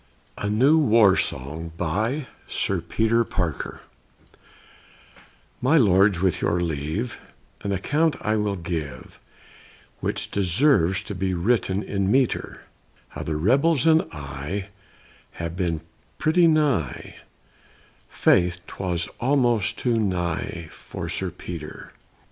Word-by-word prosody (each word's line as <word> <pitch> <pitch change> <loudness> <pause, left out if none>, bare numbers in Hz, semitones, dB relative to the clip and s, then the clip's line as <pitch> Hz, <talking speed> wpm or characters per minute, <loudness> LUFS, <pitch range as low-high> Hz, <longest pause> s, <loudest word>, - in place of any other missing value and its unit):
A 100 - -3
NEW 135 +9 +4
WAR 110 -8 +5
SONG 80 +5 -3
BY 110 - -1 0.2
SIR 95 -3 -1
PETER 110 +7 +1
PARKER 90 -9 -3 1.8
My 135 +6 +4
lords, 100 - +4
with 95 -3 +1
your 85 - +1
leave, 85 - -3 0.4
An 100 - -2
account 150 - +1
I 105 0 0
will 105 -2 0
give, 80 -7 -6 0.8
Which - - -2
deserves 95 - +3
to - - -6
be 95 0 -1
written 95 +1 +1
in 100 -1 -1
metre; 130 0 0 0.5
How - - -8
the 80 - -3
rebels 135 - +3
and 160 0 +6
I 75 +7 -5 0.6
Have 85 0 -5
been 85 -4 -1 0.4
pretty 170 +2 +4
nigh, 145 - 0 0.9
Faith, 90 0 +2
'twas 90 -3 -2
almost 120 -6 +2
too 120 -2 +1
nigh 85 -4 -2
for - - -7
Sir - - -2
Peter! 80 -4 -8
95 Hz, 115 wpm, -24 LUFS, 85-120 Hz, 1.8 s, and